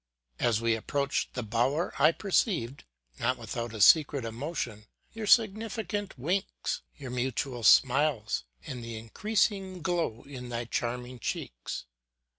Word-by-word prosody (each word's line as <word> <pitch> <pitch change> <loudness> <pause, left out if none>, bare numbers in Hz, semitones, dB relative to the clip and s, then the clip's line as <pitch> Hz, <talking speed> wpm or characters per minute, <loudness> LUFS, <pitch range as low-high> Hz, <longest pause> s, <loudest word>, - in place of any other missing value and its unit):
As 115 -3 +2
we 115 0 +2
approached 140 +5 -1
the 125 - -2
bower 120 - 0
I 155 +3 +7
perceived, 170 - 0 0.3
not 125 +2 +1
without 115 0 -4
a 110 - -7
secret 140 +2 +6
emotion, 115 -3 -4 0.3
your 225 -1 -5
significant 215 -2 +2
winks, 180 +10 -2 0.2
your 135 -5 -7
mutual 125 0 -2
smiles, 130 - +4 0.2
and 125 -2 -6
the 115 -1 -6
increasing 190 - -1
glow 170 -11 -1
in 125 -3 -8
thy 120 0 -3
charming 125 +1 -3
cheeks. - - -4
130 Hz, 125 wpm, -29 LUFS, 115-175 Hz, 0.3 s, I